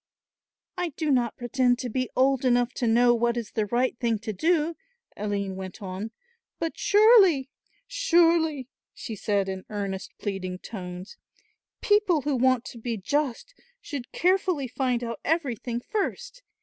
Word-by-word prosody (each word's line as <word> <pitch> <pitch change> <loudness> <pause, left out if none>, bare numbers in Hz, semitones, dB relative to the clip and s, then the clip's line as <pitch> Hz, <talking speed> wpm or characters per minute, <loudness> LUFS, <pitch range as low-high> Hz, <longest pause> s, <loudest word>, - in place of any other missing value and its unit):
"I 355 -1 0
do 310 -3 0
not 240 -4 +1
pretend 245 0 +1
to 250 - -4
be 255 +2 -2
old 265 0 +3
enough 245 -1 +2
to 240 - -1
know 240 +2 +5
what 235 0 +1
is 235 -3 -4
the 215 -2 -1
right 245 +4 +1
thing 230 -2 +1
to 220 -1 -4
do," 325 - +1 0.4
Aline 200 -2 -3
went 190 +1 -7
on, 195 +2 -5 0.5
"but 330 -1 -3
surely, 400 - +5 0.3
surely," 335 - +2 0.3
she 225 - -6
said 200 -1 0
in 190 -1 -4
earnest 200 -2 -4
pleading 190 -3 -4
tones, 180 -2 -8 0.6
"people 410 -6 +3
who 290 -2 0
want 255 -1 +2
to 235 - -9
be 230 0 -3
just 285 - -2 0.3
should 275 - -7
carefully 360 -5 +1
find 250 -1 -1
out 230 -2 -4
everything 255 -7 -1
first. 480 - -4
245 Hz, 150 wpm, -26 LUFS, 220-320 Hz, 0.6 s, know